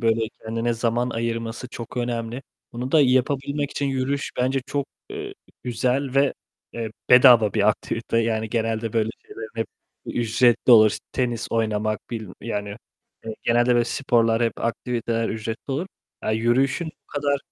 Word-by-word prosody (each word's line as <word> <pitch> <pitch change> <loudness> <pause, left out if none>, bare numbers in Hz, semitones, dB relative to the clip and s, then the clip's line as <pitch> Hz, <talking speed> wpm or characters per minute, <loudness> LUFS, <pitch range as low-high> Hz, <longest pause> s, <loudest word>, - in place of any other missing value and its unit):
böyle, 115 -1 +2 0.2
kendine 115 +1 -1
zaman 120 +2 0
ayırması 115 +1 -3
çok 120 0 -8
önemli. 120 +1 -2 0.3
Bunu 125 +2 -5
da 160 - +6
yapabilmek 140 +2 +1
için 145 - -2
yürüyüş 135 +1 -1
bence 130 +2 +1
çok, 140 0 -2 0.2
eee, 405 -1 -6 0.3
güzel 125 +3 -1
ve, 140 0 +4 0.4
eee, 115 -2 -4 0.2
bedava 125 -4 +8
bir 105 -1 +3
aktivite 115 +1 -1
yani. 110 -1 0
Genelde 115 -1 -1
böyle 110 -1 +1 0.2
şeylerin 110 -1 -8
hep 115 -1 -2 0.4
ücretli 120 +1 +2
olur. 110 -3 +7 0.2
Tenis 120 -3 -1
oynamak, 110 -2 0
bil 110 -4 -5
yani, 105 -3 -4 0.5
eee, 110 - -5
genelde 120 +1 +3
böyle 120 - +3
sporlar, 115 -2 +2
hep 115 - +2
aktiviteler 115 -1 -1
ücretli 110 +4 -5
olur. 150 +7 -2 0.4
Aaa, - - -1
yürüyüşün 130 +8 +1 0.2
bu - - -59
kadar 145 -1 0
120 Hz, 145 wpm, -24 LUFS, 115-130 Hz, 0.5 s, bedava